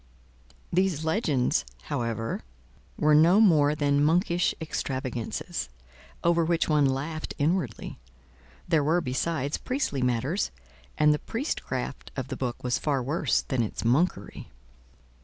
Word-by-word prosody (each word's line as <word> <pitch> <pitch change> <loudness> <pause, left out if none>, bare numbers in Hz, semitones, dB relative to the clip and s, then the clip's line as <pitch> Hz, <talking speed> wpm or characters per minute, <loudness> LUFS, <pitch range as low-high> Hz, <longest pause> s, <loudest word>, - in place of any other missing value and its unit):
These 175 -4 +1
legends, 160 - +1 0.2
however, 115 -1 -2 0.6
were 150 0 +3
no 165 +6 +6
more 155 -8 +5
than 145 -1 +2
monkish 170 +2 +2
extravagances, 130 -7 -3 0.5
over 170 0 +3
which 165 0 +1
one 150 -3 +4
laughed 150 +4 -3
inwardly; 165 +5 -1 0.7
there 160 -4 +3
were, 160 +4 +3
besides, 140 +1 -1
priestly 255 - -2
matters, 125 - 0 0.5
and 150 0 +5
the 150 - -1
priestcraft 260 +7 -4
of 130 -1 -4
the 130 - -3
book 125 -2 -4
was 125 -1 0
far 140 -4 0
worse 145 -1 +1
than 130 -2 -1
its 110 0 -3
monkery. 125 - 0
150 Hz, 120 wpm, -27 LUFS, 130-170 Hz, 0.7 s, no